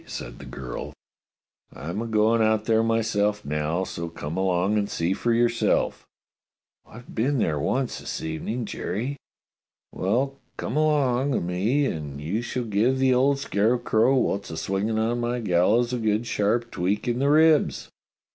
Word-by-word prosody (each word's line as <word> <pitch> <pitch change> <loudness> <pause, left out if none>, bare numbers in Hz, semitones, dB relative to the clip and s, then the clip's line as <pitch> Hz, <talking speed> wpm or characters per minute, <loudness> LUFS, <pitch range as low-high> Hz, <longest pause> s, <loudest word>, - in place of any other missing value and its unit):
said - - -7
the - - -10
girl. 65 -2 -6 0.8
I'm 85 +8 -5
a 115 - -4
goin' 110 +1 +3
out 110 -1 +2
there 110 -1 +3
myself 110 -2 0
now; 75 +4 -1
so 85 -2 -5
come 80 -1 -6
along 95 +2 +1
and 100 0 -2
see 85 +3 0
for 120 +4 -1
yourself." 115 0 +1 0.8
"I've 120 +2 -13
been 135 +5 +1
there 80 - 0
once 130 - -1
this - - -5
evening, 105 +9 -3
Jerry." 125 +7 -4 0.7
"Well, 130 +8 -1 0.2
come 120 - -4
along 140 -4 +2
o' - - +2
me 100 +12 0
and 75 - -4
you 85 +10 -2
shall 125 +1 -3
give 115 +4 +1
the 130 -1 +3
old 135 +3 +3
scarecrow 115 +1 +2
wot's 100 -5 0
a 80 - -6
swing 95 +5 -1
on 115 +2 0
my 120 +1 -1
gallows 110 +5 +2
a 125 - -1
good 110 +1 0
sharp 115 +2 0
tweak 95 +6 -1
in 120 0 0
the 140 +1 +2
ribs." 155 0 +3
110 Hz, 160 wpm, -25 LUFS, 95-125 Hz, 0.8 s, goin